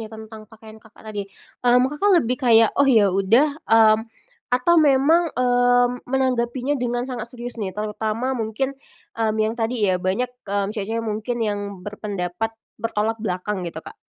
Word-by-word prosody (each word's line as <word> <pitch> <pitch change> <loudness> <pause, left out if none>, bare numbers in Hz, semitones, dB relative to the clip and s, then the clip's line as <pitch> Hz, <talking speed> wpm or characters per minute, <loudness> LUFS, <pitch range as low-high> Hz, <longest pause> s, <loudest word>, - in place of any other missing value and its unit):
nih, 220 - -7
tentang 220 -1 -11
pakaian 220 -1 -14
Kakak 220 0 -19
tadi, 205 -2 -6 0.3
mmm, 245 0 +4
Kakak 400 +7 +1
lebih 250 -6 +1
kayak, 230 -3 +5
"Oh, 280 - +4
yaudah", 225 - +3
mmm, 220 -1 +6 0.5
atau 250 +8 +2
memang, 305 +4 +4
eee, 245 0 +3 0.2
menanggapinya 255 0 0
dengan 245 0 -1
sangat 245 -3 -5
serius 240 -1 -7
nih, 190 -2 -4
terutama 215 +4 -2
mungkin, 240 +2 -2 0.4
mmm, 220 -1 -1
yang 220 0 +1
tadi 230 -1 -1
ya 185 -2 +1
banyak, 195 +8 -1 0.2
mmm, 200 0 -1
cewek 205 -3 -4
cewek 230 0 -2
mungkin 220 +2 -3
yang 205 -1 -1 0.3
berpendapat 205 -1 -4 0.3
bertolak 225 0 -1
belakang, 190 -1 -3
gitu, 160 -1 -9
Kak? - - -11
225 Hz, 160 wpm, -22 LUFS, 210-250 Hz, 0.5 s, mmm